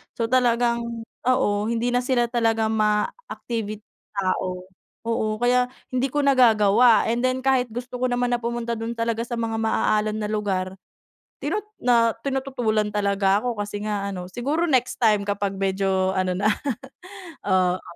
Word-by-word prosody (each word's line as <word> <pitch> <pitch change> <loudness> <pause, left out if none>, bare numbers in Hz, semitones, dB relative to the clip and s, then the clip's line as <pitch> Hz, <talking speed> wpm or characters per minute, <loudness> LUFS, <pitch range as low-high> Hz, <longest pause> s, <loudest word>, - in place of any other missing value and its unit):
So, 230 - -2
talagang 235 -2 +1 0.2
oo, 210 -5 +2
hindi 235 +1 0
na 245 - +2
sila 245 -2 0
talaga 225 -2 +1
ma-activit 215 - -2 0.3
tao, 185 -1 -1 0.4
oo, 230 -1 -1
kaya 250 +1 +3 0.2
hindi 255 +1 +1
ko 295 - 0
nagagawa 235 -4 +5
and 235 +2 0
then 255 0 +1
kahit 265 -1 +2
gusto 245 +1 -6
ko 250 - 0
naman 245 0 +1
na 245 - +2
pumunta 235 0 -2
dun 225 +1 -4
talaga 230 0 -1
sa 240 - -6
mga 225 -1 -2
maaalon 215 -1 +1
na 210 - -2
lugar 190 -3 -2 0.6
tinu - - -2 0.2
na 230 -2 +3
tinututulan 245 -6 0
talaga 200 -1 +2
ako. 225 -2 -2
Kasi 205 0 -5
nga 200 -1 -2
ano, 180 -2 -6
siguro 280 - -1
next 255 -6 +1
time 215 -4 +3
kapag 200 -1 -2
medyo 190 -1 0
ano 185 -1 0
na. 200 +4 +2 1.0
Oo. 185 -1 +2
225 Hz, 150 wpm, -24 LUFS, 205-245 Hz, 1.0 s, nagagawa